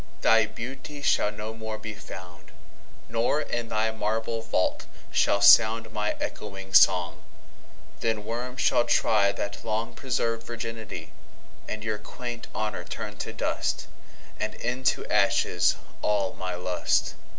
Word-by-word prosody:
Thy 110 -1 +5
Beauty 130 +6 -7
shall 105 - +3
no 105 +1 -6
more 110 -1 -5
be 110 0 -6
found; 90 -4 -11 0.6
Nor, 115 +6 +1
in 120 -6 -3
thy 110 +1 +1
marble 110 +1 -1
Vault, 110 -5 0 0.2
shall 100 - +3
soundMy 110 0 +5
ecchoing 95 -2 -5
Song: 90 -2 +5 0.8
then 110 -2 -1
Worms 125 +3 -4
shall - - +4
tryThat 100 -1 +2
long 115 +1 -2
preserv'd 115 -3 -1
Virginity:And 115 -1 -8
your 110 -1 -2
quaint 120 -2 -7
Honour 105 -5 -2
turn - - -6
to - - -4
dust; - - -1 0.5
And 110 - -2
into 125 +2 0
ashes - - +3 0.3
all 100 -2 +1
my 90 -1 -4
Lust. 90 0 0
110 Hz, 120 wpm, -27 LUFS, 105-115 Hz, 0.8 s, Thy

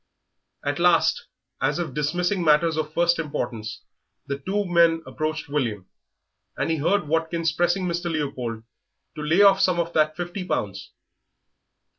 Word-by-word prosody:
At - - -1
last, - - +3 0.3
as 145 +2 +1
if 165 -6 -3
dismissing 175 +6 0
matters 160 +1 +4
of 155 -1 -2
first 170 +1 +2
importance, 115 -8 -4 0.4
the 140 0 -4
two 200 +8 -1
men 170 -2 +3
approached 155 0 -3
William, 120 -10 -2 0.7
and - - 0
he 160 - +1
heard 165 +3 +1
Watkins 165 +1 0
pressing 175 +2 +1
Mr. 175 0 -2
Leopold 130 -7 -3 0.5
to 155 - -7
lay 165 +7 +4
off 195 -1 +6
some 180 -2 +3
of 170 0 -2
that 155 0 +2
fifty 175 +2 -4
pounds. 100 - -3
160 Hz, 145 wpm, -24 LUFS, 145-175 Hz, 0.7 s, off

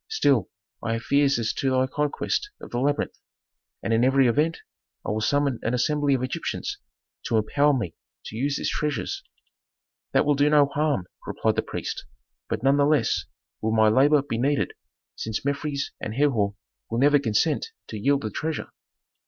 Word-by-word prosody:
Still 140 - +2 0.3
I 115 - 0
have 115 0 -3
fears 140 0 +3
as 115 -2 -1
to 135 - 0
thy 130 0 +3
conquest 150 - -1
of - - -11
the 120 - -1
labyrinth, 145 +3 0 0.6
and 115 - 0
in 115 +1 +3
every 135 0 +4
event 150 +7 +2 0.5
I - - -1
will 110 +1 -1
summon 140 0 +1
an 115 - 0
assembly 145 +2 +2
of 130 - -2
Egyptians 130 - -3 0.5
to 115 - +1
empower 140 +7 +3
me 90 -9 -3 0.3
to - - -7
use 140 +5 0
its - - -1
treasures." 150 -1 -2 0.9
"That - - +3
will 145 - +4
do 145 +1 +3
no 150 -1 +6
harm," 145 - 0 0.2
replied - - 0
the - - +2
priest. - - -5 0.5
"But - - -2
none 135 +1 +4
the 140 - +4
less 150 0 +2 0.4
will 110 0 0
my 110 -1 +5
labor 140 +5 +4
be 115 -5 -3
needed, 140 +3 +1 0.4
since 110 +3 -4
Mefres 140 0 -2
and 110 - -4
Herhor 115 -8 +2 0.3
will 115 - -2
never 145 +3 +5
consent 135 - +1 0.2
to 110 - -5
yield 140 +5 +2
the 110 - -3
treasure." 160 +8 -3
140 Hz, 175 wpm, -25 LUFS, 115-145 Hz, 0.9 s, no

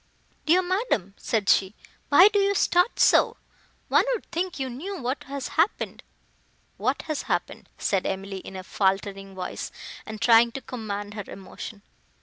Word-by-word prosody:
"Dear 360 +4 +5
madam," 365 - -1
said 215 -4 -1
she, 195 +2 +3 0.3
"why 355 +7 +8
do 415 -1 +1
you 400 0 +2
start 360 +3 +2
so? - - +5 0.5
one - - +4
would 445 - -7
think 350 +2 -2
you 265 -2 -2
knew 330 +11 -6
what 255 +3 -3
has 275 -1 -5
happened." 335 +6 0 0.8
"What - - -1
has 310 -3 -3
happened?" - - -2
said 195 -2 0
Emily, 195 0 -4
in 190 - -10
a 185 - -6
faltering 195 0 -1
voice, 185 -1 -5 0.3
and 215 -1 -8
trying 230 +1 +5
to 270 - -5
command 205 -5 -5
her 205 -2 -6
emotion. 200 +2 -9
230 Hz, 155 wpm, -26 LUFS, -, 0.8 s, why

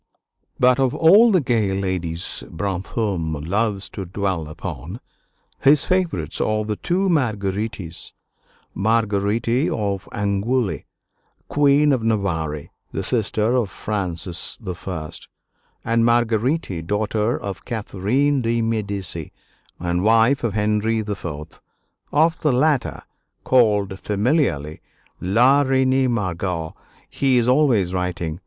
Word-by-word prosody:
But 125 +1 +4
of 130 -2 +1
all 205 +8 +6
the 185 -4 +4
gay 110 -7 0
ladies 90 -3 -2
Brantôme 90 -4 -3
loves 100 +1 0
to 100 - -6
dwell 95 -3 -2
upon, 75 -1 -7 0.6
his 140 +1 +4
favorites 175 - -1
are 110 0 0
the 105 0 -2
two 185 - 0
Marguerites: 105 - -1 0.6
Marguerite 110 - +1
of 100 -2 -2
Angoulême, 105 +3 -1 0.6
Queen 145 0 +4
of 130 - 0
Navarre, 85 -9 -1 0.3
the - - -3
sister 110 0 0
of 120 -6 +1
Francis 90 -4 -3 0.3
I., 80 -5 -4 0.7
and 115 0 +2
Marguerite, 115 - +1
daughter 105 +3 0
of 100 -3 -6
Catherine 120 +6 0
de' 115 0 0
Medici 100 -7 -3 0.5
and 90 0 -1
wife 115 +5 +4
of 110 -4 -1
Henry 105 +1 +1
IV. 85 -7 -6 0.5
Of 160 +2 +2
the 150 - +2
latter, 140 +2 +1 0.4
called 105 -6 +2
familiarly 105 - 0 0.4
"La 120 +10 +4
Reine 130 -1 +2
Margot," 90 -6 -2 0.3
he 135 -2 +1
is 120 -1 +2
always 125 -9 +3
writing. 90 -3 -3
105 Hz, 110 wpm, -21 LUFS, 95-125 Hz, 0.7 s, all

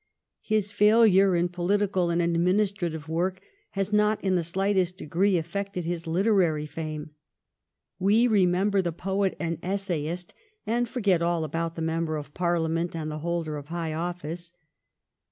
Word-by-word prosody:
His 215 -2 0
failure 205 -2 +5
in 175 +1 +1
political 185 0 0
and 170 0 +1
administrative 175 -1 0
work 180 +4 -1 0.4
has 195 +1 -1
not 210 0 +3
in 190 -1 +1
the 180 - +2
slightest 185 +1 0
degree 185 +3 +1
affected 180 +2 -4
his 170 0 -3
literary 175 -4 +2
fame. 155 0 -6 0.9
We 205 +5 +4
remember 195 -1 +3
the 170 -2 -2
poet 195 +3 -1
and 165 -2 -2
essayist, 180 -3 -3 0.3
and 240 +1 0
forget 200 -9 +1
all 170 -1 +1
about 165 +2 -3
the 165 - -3
member 160 -1 -1
of 145 -1 -8
Parliament 170 -1 0
and 155 -1 -3
the 155 - -5
holder 165 -2 -2
of 145 0 -9
high 165 -1 -3
office. 170 0 -5
175 Hz, 145 wpm, -26 LUFS, 165-195 Hz, 0.9 s, failure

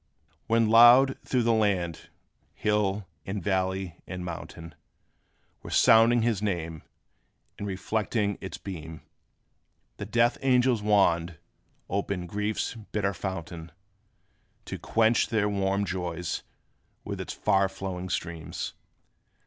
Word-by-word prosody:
When 115 0 +3
loud, 120 +4 +7
through 125 -2 0
the 115 0 +3
land, 95 -7 0 0.5
hill 105 -1 0 0.2
and 100 +1 -4
valley 95 -2 -1
and 90 -1 -6
mountain 85 -1 -8 0.9
Were - - -9
sounding 115 +1 +5
his 115 -4 0
name, 85 -6 -3 0.8
and 100 - -4
reflecting 105 +1 -1
its 95 - -6
beams, 80 -4 -8 1.0
The 105 - -6
death 120 +2 +2
angel's 125 -3 +3
wand 90 -6 +2 0.5
opened 95 -2 -3
griefs 105 +2 -2
bitter 105 -3 -3
fountain, 85 -3 -6 0.9
To - - -6
quench 115 +1 +2
their 105 -2 +1
warm 100 0 0
joys 90 -3 -3 0.6
with - - -5
its - - -5
far 95 0 +2
flowing 95 -1 -5
streams. 85 -2 -4
100 Hz, 110 wpm, -27 LUFS, 90-110 Hz, 1.0 s, loud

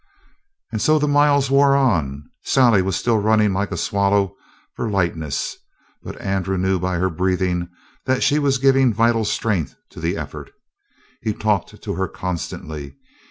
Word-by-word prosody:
And 110 -2 -3
so 155 0 +4
the 150 0 +1
miles 145 -2 +3
wore 140 0 +5
on. 80 - 0 0.2
Sally 120 -7 +4
was 95 -1 -1
still 115 -2 +1
running 105 -1 +3
like 100 +2 -1
a - - -3
swallow 100 -1 +1 0.4
for 115 - -3
lightness, 85 -7 -2 0.4
but - - -9
Andrew 95 -1 -1
knew 95 0 +1
by 90 +1 -1
her 95 +2 0
breathing 90 0 -1 0.4
that 130 0 +1
she 150 - +3
was 140 -2 +2
giving 135 -1 +4
vital 115 -1 +2
strength 105 - -1 0.2
to - - -11
the - - -1
effort. - - -7 0.7
He 110 -2 -1
talked 105 -4 -1
to - - -3
her 95 +2 -1
constantly. 80 -5 -6
100 Hz, 160 wpm, -21 LUFS, 90-125 Hz, 0.7 s, wore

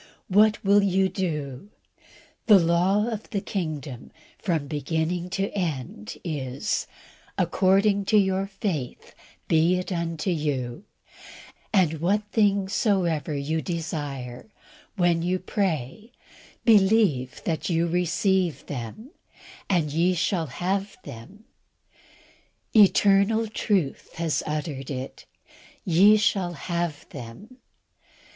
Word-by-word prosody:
What 210 +2 +4
will 200 +1 +5
you 190 -1 +2
do? 150 -4 -4 0.8
The 210 -3 +9
law 180 +4 +2
of 225 -2 -5
the 205 - -1
kingdom, 155 - -5 0.3
from 165 -7 -1
beginning 160 +4 -2
to 195 +1 -1
end, 135 - -4
is, 140 +3 -3 0.5
"According 200 +1 +2
to 215 - +3
your 190 -1 +2
faith 190 - -4 0.3
be 165 +2 +3
it 180 +1 -4
unto 170 0 -2
you," 145 -2 -2 0.9
and, 165 -6 +2
"What 200 +5 +1
things 200 -3 +2
soever 170 - +1
ye 155 +3 -1
desire, 145 - -5 0.5
when 175 -3 +2
ye 180 +2 0
pray, 185 - -3 0.5
believe 195 - +3
that 165 0 -2
ye 165 -1 +2
receive 180 +1 0
them, 145 - -7 0.6
and 165 -6 +1
ye 175 +3 +2
shall 170 -1 0
have 195 +8 -2
them." 185 - -11 1.3
Eternal 205 +1 +5
truth 205 - -1
has 165 -2 -1
uttered 150 -3 -4
it 130 -1 -6 0.6
"ye 195 +5 +6
shall 195 -4 +1
have 170 -1 -3
them." 140 - -10
175 Hz, 105 wpm, -25 LUFS, 150-200 Hz, 1.3 s, The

